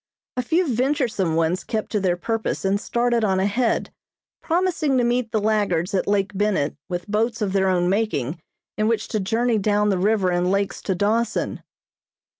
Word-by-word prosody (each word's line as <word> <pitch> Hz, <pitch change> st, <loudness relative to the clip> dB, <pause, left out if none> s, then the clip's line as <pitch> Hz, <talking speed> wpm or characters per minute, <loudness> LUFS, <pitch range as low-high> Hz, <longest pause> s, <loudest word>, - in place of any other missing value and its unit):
A 250 Hz, -, 0 dB
few 335 Hz, +8 st, +1 dB
venturesome 245 Hz, -, 0 dB
ones 165 Hz, +3 st, +1 dB
kept 220 Hz, -2 st, -3 dB
to 210 Hz, -, +1 dB
their 180 Hz, -2 st, +1 dB
purpose 225 Hz, +2 st, -2 dB
and 200 Hz, +2 st, +1 dB
started 235 Hz, -1 st, +1 dB
on 190 Hz, -3 st, +2 dB
ahead, 215 Hz, +5 st, 0 dB, 0.5 s
promising 330 Hz, -5 st, +1 dB
to 245 Hz, -, +3 dB
meet 240 Hz, -1 st, 0 dB
the 220 Hz, -, +1 dB
laggards 205 Hz, -5 st, 0 dB
at 190 Hz, -, 0 dB
Lake 200 Hz, -1 st, +1 dB
Bennett 195 Hz, -7 st, 0 dB
with 175 Hz, -1 st, -4 dB
boats 220 Hz, +3 st, 0 dB
of 205 Hz, -3 st, -1 dB
their 190 Hz, -1 st, +2 dB
own 175 Hz, -1 st, +2 dB
making 170 Hz, -, -1 dB, 0.4 s
in 215 Hz, -, +2 dB
which 225 Hz, -1 st, 0 dB
to 215 Hz, -, -1 dB
journey 225 Hz, +3 st, +1 dB
down 210 Hz, +1 st, +2 dB
the 190 Hz, -3 st, +1 dB
river 200 Hz, -1 st, +2 dB
and 175 Hz, +1 st, +1 dB
lakes 200 Hz, 0 st, -1 dB
to 190 Hz, -, -1 dB
Dawson. 220 Hz, +5 st, 0 dB
210 Hz, 180 wpm, -23 LUFS, 190-230 Hz, 0.5 s, to